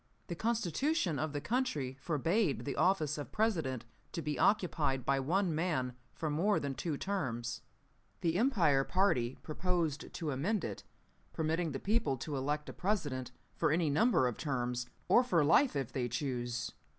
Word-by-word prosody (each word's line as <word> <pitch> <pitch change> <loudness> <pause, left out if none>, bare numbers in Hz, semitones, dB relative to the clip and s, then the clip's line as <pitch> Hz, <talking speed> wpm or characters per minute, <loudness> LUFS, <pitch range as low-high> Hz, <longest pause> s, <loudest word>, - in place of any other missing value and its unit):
"The 170 - -2
Constitution 225 - 0
of 155 0 -1
the 145 - -2
country 155 - -1
forbade 165 - +1
the 140 - -2
office 155 -6 +2
of 145 - -6
President 160 - 0 0.3
to 165 - -3
be 150 0 -2
occupied 155 - +2
by 140 0 +2
one 175 +6 +1
man 150 -6 0 0.2
for 155 -2 -3
more 190 +8 +2
than 140 -1 -3
two 150 +1 -3
terms. 125 - -2 0.6
The 165 -1 +1
Empire 180 - +3
party 135 -10 +1
proposed 165 -2 -1
to 155 -3 -3
amend 175 +10 0
it, - - -5 0.5
permitting 160 +1 0
the 135 - -3
people 210 - +1
to 145 +4 -4
elect 145 +3 -1
a - - -6
President 150 - -1 0.2
for - - +1
any 160 -2 +2
number 215 - +4
of 120 - -3
terms, 125 -4 -2 0.2
or 240 - +6
for 170 -11 +3
life 240 - +4
if 135 -4 -2
they 125 -2 -1
choose. 120 -2 -2
155 Hz, 160 wpm, -33 LUFS, 135-185 Hz, 0.6 s, or